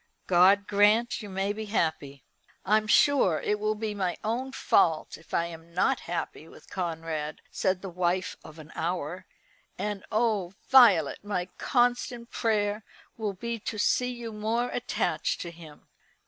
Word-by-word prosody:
God 190 Hz, +3 st, +5 dB
grant 210 Hz, +4 st, +3 dB
you 210 Hz, -, -8 dB
may 195 Hz, +1 st, -1 dB
be 220 Hz, +1 st, -5 dB
happy!" 155 Hz, -9 st, -2 dB, 0.4 s
"I'm 215 Hz, +2 st, +3 dB
sure 225 Hz, -, +4 dB
it 210 Hz, 0 st, -1 dB
will 215 Hz, +1 st, 0 dB
be 215 Hz, 0 st, -3 dB
my 185 Hz, -4 st, -2 dB
own 245 Hz, +5 st, -2 dB
fault 160 Hz, -10 st, +2 dB
if 160 Hz, -, -18 dB
I 170 Hz, -, +1 dB
am 170 Hz, 0 st, -11 dB
not 265 Hz, +8 st, +2 dB
happy 170 Hz, -2 st, -4 dB
with -, -, -16 dB
Conrad," 160 Hz, -4 st, -3 dB
said 190 Hz, -1 st, 0 dB
the 195 Hz, -, -5 dB
wife 180 Hz, +1 st, -1 dB
of 155 Hz, 0 st, -12 dB
an 155 Hz, 0 st, -12 dB
hour, 170 Hz, 0 st, -3 dB, 0.5 s
"and 205 Hz, -1 st, -3 dB
oh, 215 Hz, -5 st, +1 dB, 0.2 s
Violet! 210 Hz, -, +6 dB
my 185 Hz, -3 st, -3 dB
constant 245 Hz, -1 st, 0 dB
prayer 210 Hz, -2 st, 0 dB, 0.3 s
will 215 Hz, -3 st, -3 dB
be 235 Hz, +4 st, -4 dB
to 215 Hz, +1 st, -5 dB
see 250 Hz, +4 st, +2 dB
you 235 Hz, -2 st, -6 dB
more 225 Hz, +3 st, -1 dB
attached 175 Hz, -9 st, -1 dB
to 170 Hz, -, -5 dB
him." 160 Hz, -3 st, -14 dB
200 Hz, 155 wpm, -28 LUFS, 170-220 Hz, 0.5 s, Violet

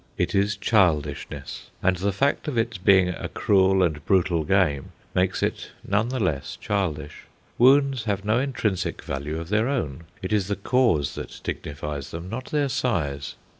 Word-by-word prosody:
It -, -, 0 dB
is 100 Hz, +1 st, +1 dB
childishness, 85 Hz, -10 st, 0 dB
and 95 Hz, 0 st, +3 dB
the 100 Hz, +3 st, 0 dB
fact 140 Hz, +11 st, 0 dB
of 140 Hz, -5 st, -2 dB
its 115 Hz, -3 st, 0 dB
being 95 Hz, -1 st, +5 dB
a 90 Hz, -, -4 dB
cruel 95 Hz, -1 st, +3 dB
and 75 Hz, -4 st, -1 dB
brutal 90 Hz, -4 st, +2 dB
game 75 Hz, -5 st, +1 dB, 0.2 s
makes 90 Hz, 0 st, +1 dB
it -, -, -2 dB, 0.2 s
none 105 Hz, +4 st, +1 dB
the 130 Hz, 0 st, -2 dB
less 75 Hz, -, -1 dB
childish. 80 Hz, -8 st, -3 dB, 0.3 s
Wounds 135 Hz, -1 st, +5 dB
have 100 Hz, -2 st, -1 dB
no 110 Hz, +3 st, +2 dB
intrinsic 120 Hz, -8 st, -2 dB
value 75 Hz, +3 st, -4 dB
of 85 Hz, +1 st, -7 dB
their 110 Hz, +3 st, +2 dB
own; 85 Hz, -, -2 dB, 0.2 s
it -, -, -2 dB
is 100 Hz, -3 st, +1 dB
the 100 Hz, -, -1 dB
cause 100 Hz, -, +2 dB
that -, -, -8 dB
dignifies 75 Hz, -1 st, -5 dB
them, 85 Hz, +2 st, -7 dB
not 125 Hz, +3 st, -4 dB
their 145 Hz, -2 st, 0 dB
size. 75 Hz, -, -2 dB
95 Hz, 170 wpm, -25 LUFS, 80-110 Hz, 0.3 s, being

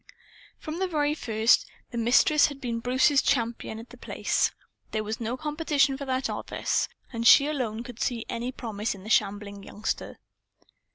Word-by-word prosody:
From 315 Hz, +2 st, -6 dB
the 380 Hz, -, +1 dB
very 300 Hz, -4 st, +1 dB
first, 225 Hz, -5 st, +2 dB, 0.2 s
the 240 Hz, -, -5 dB
Mistress 265 Hz, +6 st, +5 dB
had 285 Hz, -2 st, -8 dB
been 235 Hz, -3 st, -3 dB
Bruce's 260 Hz, +4 st, +3 dB
champion 235 Hz, -4 st, -1 dB
at 230 Hz, +2 st, -11 dB
The -, -, -12 dB
Place. -, -, 0 dB, 0.4 s
There 215 Hz, -1 st, -2 dB
was 215 Hz, +1 st, -4 dB
no 235 Hz, +2 st, -3 dB
competition 295 Hz, -2 st, +1 dB
for 280 Hz, +1 st, -6 dB
that 260 Hz, 0 st, -1 dB
office. -, -, -1 dB
She -, -, -18 dB
and 230 Hz, 0 st, +1 dB
she 280 Hz, -, +9 dB
alone 245 Hz, -7 st, -2 dB
could 240 Hz, -1 st, -10 dB
see 235 Hz, -3 st, -1 dB
any 240 Hz, +2 st, -3 dB
promise 220 Hz, -4 st, -4 dB
in 190 Hz, -, -13 dB
the 215 Hz, -, -5 dB
shambling 205 Hz, -1 st, 0 dB
youngster. 210 Hz, +2 st, -4 dB
240 Hz, 175 wpm, -27 LUFS, 220-280 Hz, 0.4 s, she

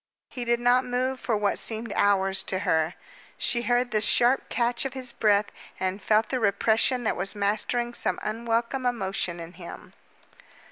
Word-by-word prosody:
He 245 Hz, -2 st, -6 dB
did 235 Hz, 0 st, +1 dB
not 245 Hz, +1 st, +3 dB
move 255 Hz, +1 st, -1 dB
for 230 Hz, -4 st, -1 dB
what 205 Hz, -1 st, 0 dB
seemed 225 Hz, -1 st, -3 dB
hours 195 Hz, -1 st, +2 dB
to 190 Hz, -, -3 dB
her. 160 Hz, -1 st, +1 dB, 0.4 s
She 235 Hz, -, +1 dB
heard 245 Hz, +1 st, +1 dB
the 215 Hz, -, +1 dB
sharp 245 Hz, +4 st, +3 dB
catch 240 Hz, 0 st, 0 dB
of 270 Hz, -1 st, -4 dB
his 255 Hz, -2 st, -4 dB
breath 210 Hz, -2 st, +3 dB, 0.3 s
and 190 Hz, +2 st, -2 dB
felt 215 Hz, +1 st, +2 dB
the 260 Hz, -, -1 dB
repression 225 Hz, +4 st, +2 dB
that 220 Hz, -, 0 dB
was 195 Hz, +4 st, -1 dB
mastering 220 Hz, +4 st, -1 dB
some -, -, -1 dB
unwelcome 230 Hz, +3 st, -1 dB
emotion 190 Hz, -6 st, -2 dB
in 165 Hz, +1 st, -9 dB
him. 175 Hz, -1 st, -11 dB
225 Hz, 170 wpm, -26 LUFS, 200-245 Hz, 0.4 s, not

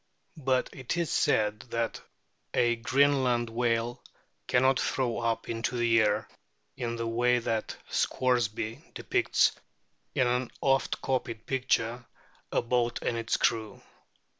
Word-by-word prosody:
But 130 Hz, -3 st, 0 dB
it 130 Hz, +5 st, -4 dB
is 170 Hz, -3 st, -1 dB
said 105 Hz, 0 st, +2 dB
that 115 Hz, 0 st, -2 dB, 0.5 s
a 120 Hz, 0 st, +3 dB
Greenland 130 Hz, -2 st, +2 dB
whale 120 Hz, 0 st, 0 dB, 0.4 s
cannot 130 Hz, +1 st, +3 dB
throw 125 Hz, -3 st, 0 dB
up 115 Hz, -1 st, -1 dB
into 115 Hz, +2 st, -2 dB
the 115 Hz, -1 st, +4 dB
air, 105 Hz, +1 st, +1 dB, 0.5 s
in 120 Hz, -3 st, -3 dB
the 115 Hz, 0 st, -3 dB
way 120 Hz, +2 st, +2 dB
that 115 Hz, -2 st, -2 dB
Scoresby 120 Hz, -3 st, 0 dB
depicts -, -, +2 dB, 0.6 s
in 125 Hz, -, +3 dB
an 125 Hz, 0 st, 0 dB
oft 135 Hz, 0 st, +1 dB
copied 120 Hz, -4 st, -2 dB
picture, 125 Hz, -2 st, 0 dB, 0.5 s
a -, -, +1 dB
boat 120 Hz, 0 st, 0 dB
and 120 Hz, -, 0 dB
its 115 Hz, 0 st, 0 dB
crew. 110 Hz, -3 st, 0 dB
120 Hz, 125 wpm, -29 LUFS, 115-125 Hz, 0.6 s, the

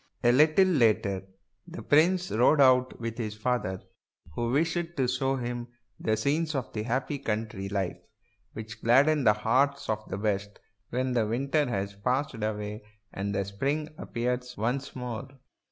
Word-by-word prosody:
A 120 Hz, -, +6 dB
little 155 Hz, +8 st, +5 dB
later 110 Hz, -, +2 dB, 0.4 s
the -, -, -8 dB
prince 175 Hz, +4 st, +3 dB
rode 125 Hz, +7 st, +4 dB
out 130 Hz, -2 st, +4 dB
with 115 Hz, +1 st, -5 dB
his 105 Hz, -2 st, -3 dB
father, 110 Hz, -5 st, -2 dB, 0.5 s
who 120 Hz, +8 st, -1 dB
wished 165 Hz, +5 st, 0 dB
to 130 Hz, -2 st, +2 dB
show 135 Hz, +2 st, 0 dB
him 120 Hz, -1 st, -4 dB, 0.3 s
the 110 Hz, 0 st, 0 dB
scenes 155 Hz, +7 st, 0 dB
of 130 Hz, -3 st, -3 dB
happy 125 Hz, +6 st, -2 dB
country 105 Hz, -5 st, -3 dB
life 95 Hz, -3 st, -2 dB, 0.5 s
which 110 Hz, +1 st, -8 dB
gladden 140 Hz, +5 st, +4 dB
the 105 Hz, -, +7 dB
hearts 130 Hz, +7 st, +1 dB
of 110 Hz, 0 st, -2 dB
the 95 Hz, -, -3 dB
best 100 Hz, -1 st, -2 dB, 0.3 s
when 130 Hz, +1 st, -1 dB
the 115 Hz, -3 st, +1 dB
winter 135 Hz, +5 st, 0 dB
has 100 Hz, -2 st, -2 dB
passed 125 Hz, +8 st, -1 dB
away 105 Hz, -1 st, -3 dB, 0.3 s
and 100 Hz, +1 st, -3 dB
spring 140 Hz, +10 st, -2 dB
appears 125 Hz, +1 st, -3 dB
once 125 Hz, +6 st, -2 dB
more. 125 Hz, -3 st, -5 dB
120 Hz, 150 wpm, -28 LUFS, 105-140 Hz, 0.5 s, the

